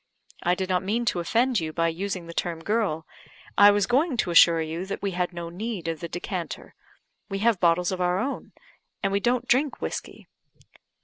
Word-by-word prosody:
I 175 +1 +2
did 190 0 -3
not 185 -1 +1
mean 220 +5 -1
to 185 - 0
offend 235 +7 +2
you 160 -1 -3
by 165 +1 +1
using 185 +1 -4
the 170 - -9
term 165 -1 -3
girl; 200 -7 0 0.5
I 205 +1 +8
was 205 -1 +3
going 265 - +1
to 180 - 0
assure 170 0 +7
you 160 +2 -3
that 195 - -5
we 200 - 0
had 180 0 -1
no 170 -1 -6
need 190 -1 -5
of 165 -1 -2
the 170 - -6
decanter. 175 +1 -5 0.6
We 195 - -2
have 230 -5 +3
bottles 175 +1 +3
of 185 -1 -3
our 180 0 +2
own 270 +8 -4 0.5
and 195 - +1
we 200 - +2
don't 245 +3 0
drink 275 +3 +2
whiskey." - - -6
185 Hz, 200 wpm, -26 LUFS, 170-215 Hz, 0.6 s, I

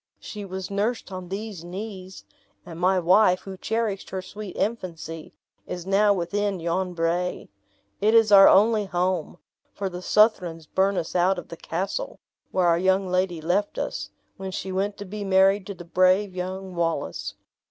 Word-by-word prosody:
She 210 -2 -7
was 190 0 -6
nursed 210 +3 -1
on 185 -1 -7
these 200 -3 -5
knees. 190 +1 -8 0.4
And 170 -2 -9
my 185 +1 +3
wife, 180 +1 +4
who 195 -1 -8
cherished 220 0 -2
her 190 -1 -4
sweet 205 0 -8
infancy, 170 -7 -4 0.4
is 175 -1 -5
now 200 +2 +4
within 200 +1 -1
yon 175 +2 -2
brae. 170 +2 -1 0.5
It 215 +2 +3
is 225 -2 +5
our 195 -1 +10
only 215 +1 +4
home, 180 -2 -1 0.4
for 195 -1 -2
the 180 0 -7
Southrons 180 -6 +2
burnt 190 +4 +1
us 165 - -3
out 180 +2 +3
of 175 - -8
the - - -7
castle, 200 - -4 0.3
where 185 -1 +1
our 170 -1 +4
young 190 +1 +2
lady 180 -2 0
left 185 +6 0
us, - - -3 0.3
when 190 0 -5
she 190 0 -5
went 200 +2 -1
to 205 - -7
be 205 +2 -6
married 195 0 +3
to 200 - -6
the 175 - -11
brave 185 +2 +2
young 185 +1 -5
Wallace. 170 -1 -2
190 Hz, 170 wpm, -25 LUFS, 180-200 Hz, 0.5 s, our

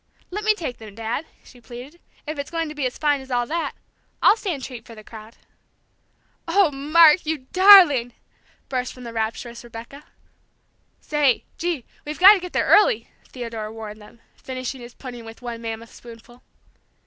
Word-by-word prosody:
"Let 415 +3 -4
me 430 0 +3
take 310 - -5
them, 215 -3 -12
Dad," 230 +7 -4 0.2
she 245 - -17
pleaded, 250 +8 -11 0.2
"if 305 -1 -5
it's 280 - -5
going 330 -2 -3
to - - -7
be 290 -4 -1
as 250 - -8
fine 290 -2 +1
as 265 - -13
all 245 -1 0
that! 330 +5 -3 0.5
I'll - - +6
stand 360 - -4
treat 250 -4 -8
for 230 - -13
the 215 - -12
crowd." 220 +1 -12 1.1
"Oh, 390 -6 +3
Mark, 305 +4 +5
you 305 -4 -3
darling!" 360 -11 +7 0.5
burst 255 -2 -3
from 250 - -12
the 235 -1 -8
rapturous 230 +2 -4
Rebecca. 240 +5 -11 1.0
"Say, 290 -5 +1
gee, 335 -7 -2 0.2
we've 300 +1 -6
got 380 +4 +9
to 410 - 0
get 360 -1 -8
there - - 0
early!" 425 +3 +4 0.2
Theodore 230 -4 -6
warned 215 -1 -9
them, 210 +2 -17 0.2
finishing 255 0 -6
his 240 0 -12
pudding 245 -3 -9
with 225 +2 -12
one 235 -1 -6
mammoth 225 0 -7
spoonful. 240 +1 -14
255 Hz, 175 wpm, -22 LUFS, 230-315 Hz, 1.1 s, got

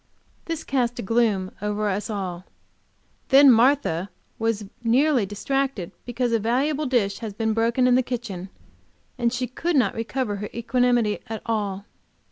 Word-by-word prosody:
This 330 -2 -4
cast 245 -3 0
a 240 - -4
gloom 205 -3 +1
over 210 0 -1
us 205 +3 -2
all. 185 -4 -4 0.8
Then 275 0 +8
Martha 230 - +3 0.3
was 225 -2 -1 0.2
nearly 250 -1 +3
distracted 265 -1 -2 0.2
because 245 0 -1
a 230 - +2
valuable 275 +7 0
dish 205 -6 +1
had 215 -3 -7
been 220 -1 0
broken 230 +3 +2
in 250 - +4
the 255 - +5
kitchen, 225 -7 -5 0.7
and 235 -1 +2 0.2
could 340 +4 -1
not 240 -8 +3
recover 225 -2 -2
her 205 +1 -5
equanimity 240 -2 +1
at 220 -1 -6
all. 205 -3 -2
230 Hz, 145 wpm, -24 LUFS, 205-255 Hz, 0.8 s, Then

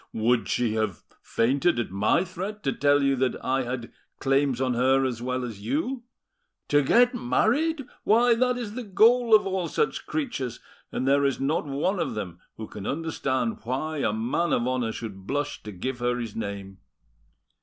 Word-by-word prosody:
Would 115 +2 +1
she 120 -3 +1
have 110 -5 -2 0.2
fainted 135 +5 +1
at 120 - -3
my 105 - +2
threat 190 +4 -6
to 135 - 0
tell 145 0 +3
you 140 0 +3
that 130 -1 +1
I 135 +1 +1
had 125 -1 -5 0.3
claims 135 -2 +1
on 130 -1 +1
her 130 +2 +3
as 120 -3 -3
well 125 0 -2
as 110 -4 -8
you? 265 - -2 0.6
To 145 0 +5
get 245 - +4
married! 285 +5 +1 0.2
Why, 235 +3 +5
that 250 +1 +1
is 230 -4 -5
the 250 - -4
goal 225 +3 +5
of 215 - +4
all 190 -2 -1
such 450 - -1
creatures, 240 - -3 0.3
and 130 - -2
there 140 +1 +4
is 135 -2 +1
not 145 +3 0
one 155 +8 -1
of - - -2
them 90 -5 -5 0.2
who 110 - -6
can 100 -2 -7
understand 135 -6 -1
why 135 +7 -3
a 135 - +1
man 120 +11 0
of 120 - +1
honour 125 -3 0
should 100 -4 -8
blush 145 +3 -2
to 105 - -8
give 125 +7 -4
her 120 0 0
his 115 -4 -5
name. 100 -3 -5
135 Hz, 185 wpm, -26 LUFS, 120-190 Hz, 0.6 s, To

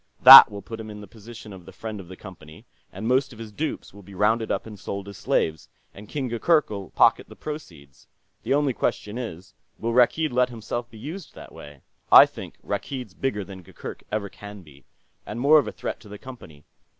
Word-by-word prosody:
That - - +12
will 100 -1 -9
put 115 +3 -8
him 110 -1 -8
in 105 0 -9
the 105 - -10
position 110 +1 -12
of 90 -3 -14
the - - -10
friend 110 -2 -7
of 95 - -11
the 95 - -10
Company, 80 -6 -13 0.3
and 100 +4 -6
most 130 +2 +1
of 115 - -13
his 110 -1 -9
dupes 150 0 -5
will 100 - -13
be 100 0 -14
rounded 110 +3 +1
up - - -2
and 105 -3 -11
sold 100 +1 -6
as 100 - -9
slaves, 80 -2 -1 0.2
and 105 +1 -13
King 140 -3 -3
Gurgurk'll 120 - 0
pocket - - +3
the - - -13
proceeds. 80 - -10 0.3
The - - 0
only 145 -2 +1
question 105 0 -3
is, 95 -7 -8 0.2
will 115 +1 -3
Rakkeed 135 +6 +3
let 125 0 +2
himself 120 +1 -6
be 115 - -14
used 160 - -9
that - - -12
way? 75 -2 -13 0.3
I - - +10
think - - -11
Rakkeed's 125 -8 -5
bigger 105 -2 -3
than 95 -1 -11
Gurgurk 85 - -10
ever 105 -1 -2
can 100 0 -12
be. 70 -4 -19 0.4
And 110 - -7
more 150 +4 +6
of 145 - -2
a - - -4
threat - - -6
to 105 - -16
the 105 - -9
Company. 100 - -13
105 Hz, 215 wpm, -24 LUFS, 95-125 Hz, 0.4 s, That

